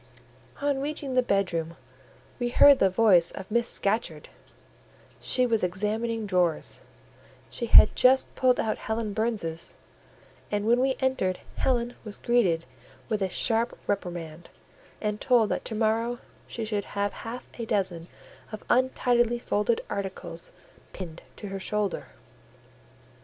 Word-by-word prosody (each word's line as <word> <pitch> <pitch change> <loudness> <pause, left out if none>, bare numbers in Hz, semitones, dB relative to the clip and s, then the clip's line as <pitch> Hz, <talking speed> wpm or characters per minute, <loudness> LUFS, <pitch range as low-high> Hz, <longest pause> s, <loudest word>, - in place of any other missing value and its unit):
On 285 -1 0
reaching 285 -2 -4
the 255 - +4
bedroom, 180 -7 -1 0.6
we 245 -1 0
heard 280 +2 +7
the 195 - +4
voice 185 -4 +4
of 190 +1 -8
Miss 235 +1 +2
Scatcherd: 195 -7 -1 0.9
she 255 - +1
was 225 -4 +1
examining 215 +5 -1
drawers; 180 -4 0 0.7
she 235 - -4
had 215 - +8
just 260 +1 +4
pulled 255 -1 +2
out 220 - -1
Helen 220 -1 -3
Burns's, 200 -7 -1 0.7
and 205 0 -1
when 235 +2 +4
we 265 +1 +2
entered 260 -9 0 0.2
Helen 240 -2 0
was 210 -2 -8
greeted 190 -9 +1 0.4
with 215 -2 -1
a 190 - 0
sharp 230 +5 0
reprimand, 175 -4 -4 0.5
and 210 -1 -3
told 240 -5 +3
that - - -2
to 220 - -3
morrow 225 +2 0 0.3
she 230 - -4
should 210 -2 -2
have 200 0 0
half 240 +2 -7
a 230 - -3
dozen 185 -6 -1 0.4
of 215 - -7
untidily 245 -2 +2
folded 225 -1 0
articles 190 -4 -6 0.4
pinned 170 -3 -8
to 205 - -8
her 195 0 -5
shoulder. 210 0 -2
215 Hz, 135 wpm, -27 LUFS, 190-240 Hz, 0.9 s, had